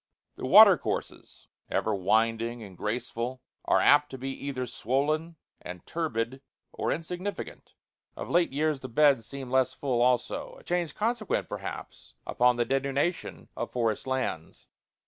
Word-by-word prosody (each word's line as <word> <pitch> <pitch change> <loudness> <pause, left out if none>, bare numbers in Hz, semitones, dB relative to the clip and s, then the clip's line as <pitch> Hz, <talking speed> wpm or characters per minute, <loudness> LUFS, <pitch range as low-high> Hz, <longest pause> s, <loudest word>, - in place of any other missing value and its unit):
The - - -5
watercourses, - - +4 0.2
ever 110 - 0
winding 115 +4 +1
and 95 -3 -11
graceful, 120 +5 -4 0.2
are - - +3
apt 145 0 +5
to 130 - -7
be 135 +1 -4 0.2
either 130 -2 -2
swollen 145 +8 -1 0.3
and 90 0 -9
turbid 130 -6 -3 0.3
or - - -2
insignificant; 180 +5 -5 0.4
of - - -5
late 175 -3 +2
years 150 +1 0
the 130 - -8
beds 135 -3 +3
seem 135 -1 -7
less 130 -1 +2
full 130 -4 -1
also 125 0 0
a - - -16
change 175 -4 -2
consequent, 225 0 -1
perhaps, - - -8
upon 125 0 +3
the 120 0 0
denudation 140 +6 -1
of - - -4
forest 115 -1 -1
lands. 130 -12 -3
130 Hz, 140 wpm, -28 LUFS, 115-150 Hz, 0.4 s, apt